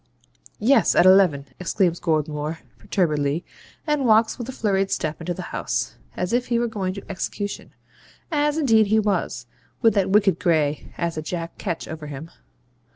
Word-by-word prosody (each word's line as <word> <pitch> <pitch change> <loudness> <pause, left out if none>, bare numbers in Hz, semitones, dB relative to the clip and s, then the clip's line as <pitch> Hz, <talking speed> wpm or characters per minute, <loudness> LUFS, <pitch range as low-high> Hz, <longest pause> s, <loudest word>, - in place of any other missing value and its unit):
'Yes, 235 +1 +3
at - - +5
eleven,' 185 -7 +5
exclaims 180 -1 +1
Goldmore, 155 -1 -1 0.2
perturbedly, 155 -3 0 0.4
and 300 -3 +1
walks 220 +2 +4
with 240 +1 -5
a - - -2
flurried 195 -5 0
step 155 +1 -2
into 175 +2 -3
the - - -8
house, - - -2 0.2
as 180 - -2
if 245 +1 +1
he 235 - +1
were 235 0 +1
going 190 -4 -3
to 200 - -8
execution 200 +1 -4 0.6
(as 295 0 +1
indeed 225 -8 +4
he 215 +2 +3
was, 190 - 0 0.4
with 225 -2 +6
that 195 -2 +1
wicked 195 -3 +3
Gray 155 -5 0
as 170 -2 -2
a - - -1
Jack 165 +1 -5
Ketch 170 -5 -3
over 155 -1 -7
him). 145 +3 -8
185 Hz, 165 wpm, -23 LUFS, 160-220 Hz, 0.6 s, with